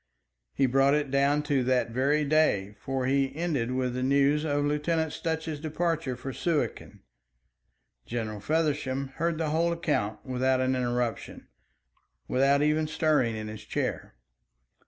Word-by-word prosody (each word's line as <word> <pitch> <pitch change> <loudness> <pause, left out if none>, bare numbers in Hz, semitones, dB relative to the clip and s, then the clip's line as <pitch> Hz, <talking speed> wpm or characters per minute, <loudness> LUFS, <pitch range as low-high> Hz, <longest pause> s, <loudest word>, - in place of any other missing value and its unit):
He 135 - +3
brought 135 +2 +3
it 145 -3 -1
down 140 +2 +2
to 145 -3 +1
that 125 -2 +1
very 140 +5 +1
day, 140 -10 +2
for 135 -1 -2
he 135 +1 +1
ended 155 -8 -1
with 130 -1 -1
the 125 - -3
news 140 +3 +3
of 145 -2 0
Lieutenant 155 +2 0
Sutch's 160 -2 -3
departure 160 -3 -1
for 135 +2 -6
Suakin. 165 0 -2 1.1
General 110 -3 -4
Feversham 140 0 -1
heard 165 0 0
the 155 -2 -1
whole 165 +2 +2
account 150 -11 -2
without 130 0 +1
an 130 0 +1
interruption, 120 -2 -2 0.8
without 140 +2 +3
even 155 +1 +2
stirring 150 -7 +1
in 110 0 -5
his 110 0 -8
chair. - - -3
140 Hz, 140 wpm, -28 LUFS, 130-155 Hz, 1.1 s, He